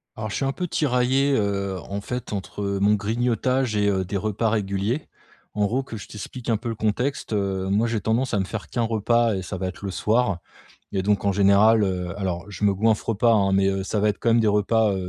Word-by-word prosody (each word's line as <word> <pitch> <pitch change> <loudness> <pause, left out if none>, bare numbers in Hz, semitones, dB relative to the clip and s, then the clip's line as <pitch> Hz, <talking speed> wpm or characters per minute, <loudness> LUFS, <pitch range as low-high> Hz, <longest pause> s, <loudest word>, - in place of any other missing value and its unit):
Alors 110 -1 -5
je - - -3
suis 135 - -1
un 135 - +1
peu 180 +5 -4
tiraillé, 135 -1 +2
heu, 100 -4 -1
en 100 +3 -5
fait 125 +1 -5
entre, 100 +1 -5
heu, 100 0 -1
mon 105 +2 +4
grignotage 120 +3 0
et 105 0 +2
heu, 95 -1 +1
des 100 +2 -3
repas 110 +3 0
réguliers. 105 +5 -1 0.5
En 105 0 +1
gros 125 +6 0
que 115 -4 -8
je 100 - -9
t'explique 120 +4 -7
un 115 - +3
peu 120 +2 -5
le 115 - -3
contexte, 110 +4 -1
heu, 95 -2 -1
moi 105 +4 +2
j'ai 110 -2 -1
tendance 115 +5 0
à 105 - +2
me 95 - 0
faire 105 +2 -6
que - - -4
1 - - +3
repas, 115 +1 +2
heu, - - -1
et - - -4
ça 95 +1 -5
va 95 +1 -2
être 95 +2 -8
le 95 - -3
soir 105 -1 +1 0.5
et 95 - 0
donc 100 0 +1
en 100 - +3
général, 100 +3 +5
heu, 90 -2 -2
alors 90 -3 -3
je 105 - -7
me 100 - +4
goinffre 110 +2 +1
pas, 115 +3 +4
hein, 100 -3 +3
mais, 95 0 +3
heu 95 0 -1
ça 105 +2 -1
va 105 +1 +3
être 105 - -2
quand 115 - +1
même 115 +1 +4
des 110 - +2
repas 105 +1 +2
105 Hz, 255 wpm, -24 LUFS, 100-115 Hz, 0.5 s, général